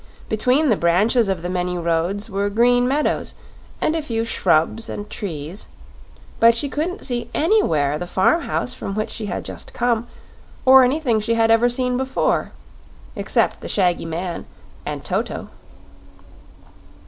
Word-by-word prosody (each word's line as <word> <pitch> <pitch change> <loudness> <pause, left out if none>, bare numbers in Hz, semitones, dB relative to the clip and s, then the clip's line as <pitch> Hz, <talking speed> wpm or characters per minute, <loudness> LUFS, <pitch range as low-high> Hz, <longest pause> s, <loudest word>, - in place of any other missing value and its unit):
Between 255 +7 +2
the 220 - +4
branches 200 +6 +2
of 185 -3 -2
the - - -2
many 180 0 -2
roads 170 +4 -1
were 200 -1 -1
green 245 +3 +3
meadows 290 +4 0 0.4
and 310 - +1
a 325 - 0
few 230 -6 -2
shrubs 190 +1 +1
and 205 - -6
trees, 170 -1 -6 0.7
but 230 0 +6
she 280 +5 +1
couldn't 335 +7 -3
see 240 -2 -3
anywhere 155 - +2
the 175 - -5
farm 190 - +2
house - - -2
from 195 - -5
which 215 0 -2
she 215 - -4
had 185 - -4
just - - -7
come, 240 -1 0 0.6
or 265 0 +8
anything 250 -3 +1
she 230 +2 0
had 225 0 +3
ever 230 +2 +4
seen 250 0 0
before 265 0 0 0.6
except - - 0
the - - -7
shaggy 180 -4 +1
man 170 +2 -4 0.4
and - - -5
Toto. - - -3
225 Hz, 150 wpm, -21 LUFS, 180-250 Hz, 0.7 s, or